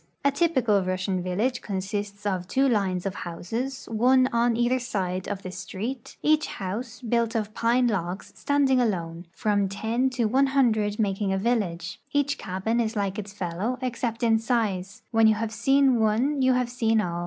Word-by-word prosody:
A 280 - +5
t}"pical 260 - +2
Russian 185 0 -1
village 200 +8 -1
consists 200 +1 -4
of 185 -3 -1
two 270 +7 +2
lines 195 -6 0
of 195 - -1
houses, 230 +10 -4
one 255 +4 +4
on 235 0 +2
either 240 +2 +2
side 190 -6 -3
of 200 -1 -4
the 185 - -5
street, 210 +7 -6
each 305 0 +3
house, 225 +6 -5
built 235 0 0
of 215 -1 -2
pine 240 +3 +2
logs, 190 -4 -2
stand 285 -1 +1
ing 255 -1 +4
alone, 170 -6 -2
from 205 0 0
ten 225 +6 0
to 250 -2 -1
one 265 +5 +3
hundred 220 -6 +2
making 200 -2 0
a 195 - +1
village; 195 -5 -1
each 285 0 +1
cabin 195 +5 -1
is 225 -1 -1
like 200 0 -1
its 205 -1 -6
fellow 200 +5 -3
except 240 -2 -3
in 225 -1 +4
size; 215 -5 -1
when 225 -1 +5
you 220 - +4
have 220 0 -3
seen 270 +2 +3
one 240 +7 +2
you 260 0 +4
have 250 -1 0
seen 225 -3 +2
all. 175 -4 -2
220 Hz, 180 wpm, -26 LUFS, 195-250 Hz, -, A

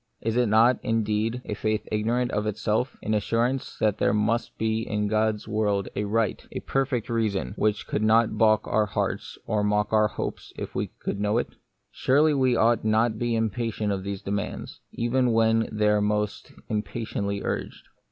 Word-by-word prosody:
Is 115 0 -2
it 125 -1 +3
not, 115 +4 +5
indeed, 115 +1 0
a - - -3
faith 110 +1 -2
ignorant 120 +4 0
of 105 0 -1
itself? 110 +4 -1
— - - -22
an 110 - -1
assurance 115 +5 0
that 105 -2 +1
there 105 - +2
must 115 +3 0
be 110 0 0
in 105 -2 -1
God's 110 0 0
world 105 -3 0
a 105 - -1
right, 110 0 0
a - - -5
perfect 135 -4 -1
reason, 110 - -1
which 105 -1 0
would - - 0
not 110 +1 +3
baulk 110 -1 +3
our 105 0 +2
hearts 95 - -3
or 105 -1 0
mock 105 +1 +1
our 110 -1 +5
hopes - - -6
if - - -6
we - - -1
could 100 - -3
know 105 +2 +1
it? - - -1 0.4
Surely 150 +4 +3
we 130 -3 +2
ought 115 0 +3
not 110 +2 +3
to 110 - -6
be 120 -1 0
impatient 110 -1 -1
of 95 - -3
these 100 -1 -5
demands, 100 0 -4
even 120 +1 +1
when 115 0 +3
they 105 -1 +2
are 105 0 +3
most 105 0 -1 0.2
impatiently 105 -2 -3
urged. - - -4
110 Hz, 185 wpm, -26 LUFS, 105-115 Hz, 0.4 s, not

